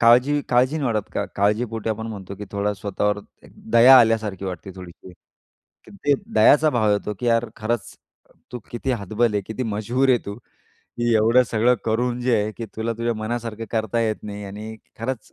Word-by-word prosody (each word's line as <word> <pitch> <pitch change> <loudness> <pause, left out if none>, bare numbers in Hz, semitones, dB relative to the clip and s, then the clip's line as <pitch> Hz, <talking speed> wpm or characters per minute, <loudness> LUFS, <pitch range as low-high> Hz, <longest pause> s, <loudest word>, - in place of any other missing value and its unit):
काळजी 125 +5 +5
काळजी 130 +5 +2
नाही 145 - -2
वाढत 105 -2 -2
का, - - 0
काळजीपोटी 110 +2 0
आपण 110 +1 -4
म्हणतो, 100 -3 -7
की 105 - -7
थोडा 100 +1 0
स्वतःवर 105 +1 -1 0.2
एक - - -17 0.2
दया 125 +3 +9
आल्यासारखी 110 -4 +1
वाटते, 95 +1 -6
थोडीशी. 90 0 -12 0.8
ते 105 +8 0 0.2
दयाचा 150 +1 +5
भाव 110 -5 +1
येतो, 105 +1 -2
की 120 - -2
यार, 115 0 +2
खरंच 115 +1 -3 0.6
तू 125 - -4
किती 120 +2 -3
हतबल 110 +1 0
आहे, 100 - +1
किती 110 +3 -4
मजबुर 115 +4 0
आहे 125 -2 +5
तू. 100 +3 -6 0.8
एवढं 115 +3 +5
सगळं 120 +3 +3
करून 120 +2 0
जे 125 -1 +2
आहे, 105 +1 -2
की 115 0 -7
तुला 115 +1 -1
तुझ्या 115 0 -1
मनासारखं 115 0 -4
करता 110 0 -1
येत 110 -2 0
नाही 105 -1 -7
आणि 105 +3 -8 0.2
खरंच 115 0 -5
110 Hz, 175 wpm, -22 LUFS, 105-120 Hz, 0.8 s, दया